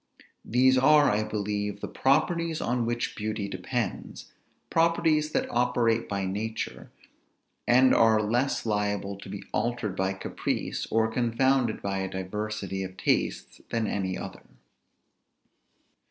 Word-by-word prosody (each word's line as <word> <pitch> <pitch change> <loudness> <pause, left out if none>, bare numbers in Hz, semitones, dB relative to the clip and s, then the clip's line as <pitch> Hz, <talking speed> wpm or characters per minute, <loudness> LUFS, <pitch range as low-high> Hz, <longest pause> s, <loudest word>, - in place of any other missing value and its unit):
These 130 +2 +4
are, 145 +2 +6
I 105 +1 +1
believe, 105 -1 -3
the - - -4
properties 160 +4 +1
on 120 -1 0
which 120 0 -2
beauty 105 -1 -3
depends; 100 +3 -4 0.4
properties 165 -2 +2
that - - +1
operate 120 -2 +1
by 100 -1 -1
nature, 110 +4 -4 0.8
and 130 +2 +6
are 110 -1 +5
less 120 +6 0
liable 105 -2 -1
to 100 - -10
be 100 0 -6
altered 120 -3 -1
by 95 0 0
caprice, 95 - -3
or 110 0 +2
confounded 120 +1 +1
by 100 -1 -1
a 95 0 -2
diversity 100 +1 -4
of 95 0 -6
tastes, - - -1
than 115 -1 0
any 95 -3 -2
other. - - -8
110 Hz, 125 wpm, -27 LUFS, 100-125 Hz, 0.8 s, are